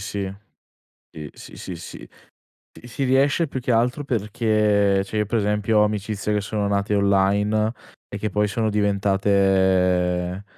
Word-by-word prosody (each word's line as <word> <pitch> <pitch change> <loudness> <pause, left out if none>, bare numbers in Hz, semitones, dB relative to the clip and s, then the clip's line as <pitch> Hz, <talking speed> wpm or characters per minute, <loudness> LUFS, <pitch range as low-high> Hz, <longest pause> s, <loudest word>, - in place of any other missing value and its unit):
si. 100 -1 -4 0.8
Sì, 75 -2 -8
sì, - - -13
sì, 90 - -7
sì. - - -10 0.7
Sì, 120 - -12
sì 135 +3 -4
riesce, 140 +5 +2
più 135 - -5
che 125 0 -2
altro 125 +5 +1
perché 105 -4 +1
cioè 105 +2 -6
io 105 - +1
per 115 +3 -1
esempio 105 +1 +1
ho - - +5
amicizie 105 0 -2
che 105 - 0
sono 100 0 -2
nate 100 +1 0
online, 100 +2 +2 0.4
e 100 - -7
che 105 +1 -3
poi 105 +2 0
sono 110 +2 -1
diventate, 95 -3 +1
105 Hz, 155 wpm, -22 LUFS, 95-110 Hz, 0.8 s, ho